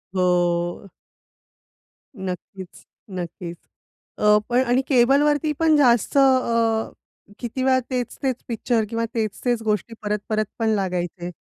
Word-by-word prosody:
हो. 175 0 +1 1.3
नक्कीच, 190 -1 -8 0.2
नक्कीच. 175 -2 -6 0.6
अ, 210 0 +5
पण 245 +1 +3
आणि 245 +2 +3
केबलवरती 290 +4 +3
पण 320 -1 +4
जास्त 245 -2 +3
अ, 230 -4 +3 0.5
किती 250 +2 -4
वेळा 260 0 +4
तेच-तेच 255 0 -2
पिक्चर 230 0 0
किंवा 230 +1 -1
तेच-तेच 230 +2 -1
गोष्टी 215 +1 -1
परत-परत 210 +1 -1
पण 225 -1 +1
लागायचे. 180 -2 -3
225 Hz, 105 wpm, -23 LUFS, 190-250 Hz, 1.3 s, अ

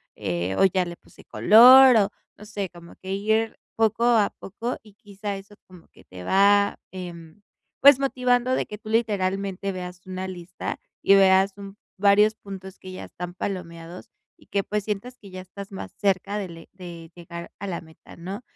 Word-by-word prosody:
eh, 90 +2 -2
o - - +4
ya 185 -1 +2
le 175 0 -7
puse - - -19
color, 255 +4 +8
o 200 -2 +3 0.3
no 210 - -12
sé, 205 -3 -4
como 170 0 -14
que 190 0 -6
ir 220 +3 0 0.2
poco 225 +1 +1
a 230 -4 +3
poco. 230 +6 -5
Y, 210 -2 -18
quizá, 205 0 -6
eso 200 +2 -13
como 180 -3 -16
que - - -20
te 90 -1 -11
va, 200 - +3
em, 175 -1 -9 0.4
pues, 280 -1 +8
motivando 255 -2 +1
de - - -1
que 210 - -8
tú 215 - -10
literalmente 200 -3 -1
veas 180 -1 -7
una 185 0 -5
lista, 180 -1 -6 0.2
y 195 - +6
veas 195 0 +5
un 200 0 -10 0.2
varios 205 +2 +4
puntos 190 -2 -10
que 185 - -10
ya 185 - -7
están 180 0 -8
palomeados, 170 -2 -6 0.3
y - - -23
que, 200 - -1
pues, 210 +1 -2
sientas 220 +4 -4
que 200 - -14
ya 185 - -7
estás 200 +2 -10
más 190 - -7
cerca 200 0 0
de 170 -2 -9
llegar 170 0 -9
a 200 - -5
la 175 -3 -4
meta, 160 -1 -16
¿no? 190 +6 -7
195 Hz, 180 wpm, -24 LUFS, 180-210 Hz, 0.4 s, color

